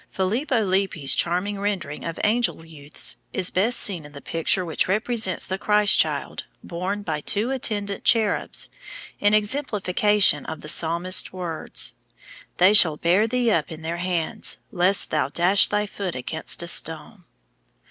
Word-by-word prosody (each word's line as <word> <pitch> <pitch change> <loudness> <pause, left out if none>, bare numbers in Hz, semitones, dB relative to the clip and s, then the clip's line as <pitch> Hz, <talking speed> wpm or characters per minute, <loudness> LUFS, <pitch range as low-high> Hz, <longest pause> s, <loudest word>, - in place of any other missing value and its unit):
Filippo 225 +5 -1
Lippi's 185 -7 0
charming 185 +4 0
rendering 185 -8 -4
of 165 - -6
angel 220 -6 0
youths 150 -2 -3 0.2
is 185 -1 -1
best 220 +6 +1
seen 180 -6 +2
in 145 0 -14
the 140 - -10
picture 165 +5 -2
which 160 -3 -1
represents 215 -1 0
the 190 +1 -5
Christ 210 -1 +3
child - - -2 0.2
borne 185 +4 -5
by 155 -5 -4
two 215 - -1
attendant 205 -6 -3
cherubs 220 -3 +1 0.5
in 205 +1 +3
exemplification 210 - +2
of 160 -1 -7
the 150 - -5
psalmist's 170 +4 +4
words, 175 -3 -1 0.6
"They 185 +3 +5
shall 165 -7 +7
bear 185 +8 +2
thee 245 0 0
up 165 -7 -1
in 160 0 -9
their 165 +1 -4
hands, 180 +4 -3
lest 185 0 +1
thou 130 - 0
dash 180 +6 +3
thy 210 0 -1
foot 195 -3 -6
against 160 +6 -3
a - - -7
stone." 170 +4 -4
185 Hz, 150 wpm, -22 LUFS, 165-210 Hz, 0.6 s, shall